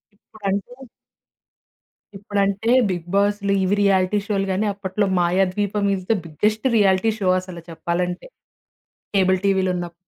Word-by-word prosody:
ఇప్పుడంటే... 200 +2 -5 1.4
ఇప్పుడంటే 200 +2 -1 0.2
బిగ్ 175 -2 -4
బాస్‌లు, 200 0 +1
ఇవి 190 +2 +2
రియాలిటీ 195 0 +2
షో‌లు 200 -3 0
గాని, 190 +3 0
అప్పట్లో 200 +1 -2
Mayadweepam 195 +3 0
is 185 -1 -7
the - - +4
biggest 210 - -1 0.5
show, 195 - -1
అసలు 180 -2 -10
చెప్పాలంటే. 175 - -3 0.9
కేబుల్ 190 -1 +3
టీవీలు 190 -1 +2
ఉన్నప్ 175 -1 -5
195 Hz, 115 wpm, -21 LUFS, 185-205 Hz, 1.4 s, the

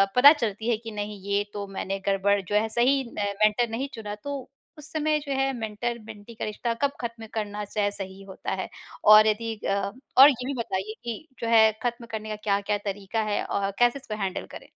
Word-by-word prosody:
पता 280 +4 +10
चलती 225 -5 -2
है 230 - +2
कि 225 0 -8
नहीं 210 -1 -5
ये 200 0 +2
तो 200 -1 -4
मैंने 195 0 -4
गड़बड़ 200 +1 +3
जो 195 +2 -3
है 215 +1 +3
सही 260 +4 +3 0.2
मेंटर 210 +3 +2
नहीं 245 +5 -2
चुना 210 -2 -5
तो 280 -2 -5 0.3
उस 300 0 -9
समय 310 -1 +1
जो 285 -1 -7
है 270 0 +2
मेंटर 235 +1 -3
मेंटी 215 +1 -11
का - - -4
रिश्ता 230 +2 -2
कब 280 - +3
खत्म 230 -1 -5
करना 210 -1 -3
चाहे 205 0 0
च - - -13
सही 195 0 -7
होता 190 -1 -6
है? - - -4 0.4
और 215 +1 +9
यदि 225 +1 0
अ, 200 -2 -2 0.4
और 275 +3 +11
ये 250 -2 -2
भी 280 - -2
बताइए 210 -1 -2
कि 235 +6 -5
जो 230 - -3
है 220 -1 +6
खत्म 240 0 -2
करने 215 -1 -4
का 215 - -2
क्या-क्या 200 0 +1
तरीका 200 +2 -2
है - - +1
अ, 200 0 -1
कैसे 240 +3 +4
इसको 220 -5 -6
हैंडल 190 -1 -2
करें। - - -10
220 Hz, 215 wpm, -26 LUFS, 205-240 Hz, 0.4 s, और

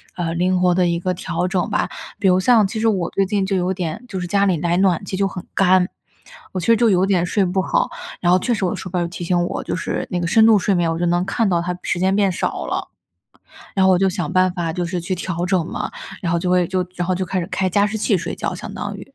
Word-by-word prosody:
呃， 170 -2 -2
灵 180 +1 +1
活 180 -1 +3
地 180 -1 +3
一 170 0 0
个 185 +1 -1
调 175 +1 -2
整 185 +2 -1
吧。 - - 0 0.3
比 200 - +2
如 185 0 +4
像 220 -1 +4
其 220 - -4
实 225 - +2
我 185 -6 +1
最 195 - +1
近 200 0 0
就 195 - 0
有 180 +1 0
点 185 +5 -4
就 190 -5 -5
是 180 - -4
家 200 +1 +2
里 185 -4 +2
来 170 +2 0
暖 190 -1 +2
气 190 - -4
就 195 0 +2
很 180 -2 -7
干， 185 -1 +4 0.7
我 185 - -2
其 - - -4
实 230 - +6
就 235 -2 +4
有 185 0 +3
点 185 -3 +2
睡 195 +2 +1
不 185 +1 0
好， - - 0 0.3
然 175 -1 +3
后 185 - +5
确 240 +5 0
实 210 - -2
我 175 - 0
的 - - -4
手 185 - -7
表 180 0 -1
就 170 - -1
提 175 +1 -7
醒 175 0 +1
我， - - -4
就 - - -3
是 185 - -3
那 180 - -1
个 175 - -2
深 220 +4 +5
度 225 -1 +6
睡 200 +1 +1
眠， 170 -2 +1
我 165 - -2
就 175 - 0
能 175 +1 +1
看 220 +3 0
到 170 -2 +1
它 180 +1 -3
时 175 - -1
间 190 +1 +2
变 200 -2 +3
少 - - -2
了。 - - -3 0.9
然 190 -1 +3
后 - - +5
我 180 - +4
就 195 +1 +3
想 175 -2 -3
办 185 -1 +3
法 170 -3 -2
就 175 +1 -2
是 175 +1 -3
去 180 +2 -2
调 175 -1 -3
整 180 -3 +1
嘛， - - -4 0.3
然 170 - -1
后 170 - +2
就 180 +1 -1
会 180 -1 +3
就 185 -1 -1
然 175 -1 -2
后 185 - +2
就 185 +1 -2
开 185 +1 -2
始 170 - -4
开 185 0 0
加 200 +3 +3
湿 220 +1 -3
器 210 -1 +2
睡 - - -4
觉， - - -3
相 - - -7
当 - - -4
于。 275 - -13
185 Hz, 320 characters per minute, -20 LUFS, 175-195 Hz, 0.9 s, 实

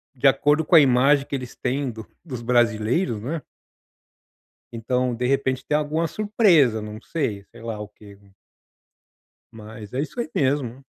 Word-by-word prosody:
de 135 +2 +3
acordo 145 +3 +3
com 170 - +3
a - - +11
imagem 135 +2 +4
que 140 - -4
eles 125 -3 -7
têm 135 +2 -2
dos 110 -1 -10 0.2
dos 130 -7 -6
brasileiros, 120 - +1
não 130 +8 -4
é? 160 - -5 1.3
Então, 125 +2 -1
de 120 +2 -3
repente, 130 -1 0
tem 150 - +1
alguma 155 +2 -1
surpresa, 175 - +3
não 105 0 -8
sei, 115 -12 -3
sei - - -14
lá 115 -1 -5
o 105 0 -7
que 105 -1 -16 1.4
mas 110 -1 -11
é 130 - -1
isso 155 - -6
aí 240 - -2
mesmo. 135 -2 -1
130 Hz, 165 wpm, -23 LUFS, 115-145 Hz, 1.4 s, a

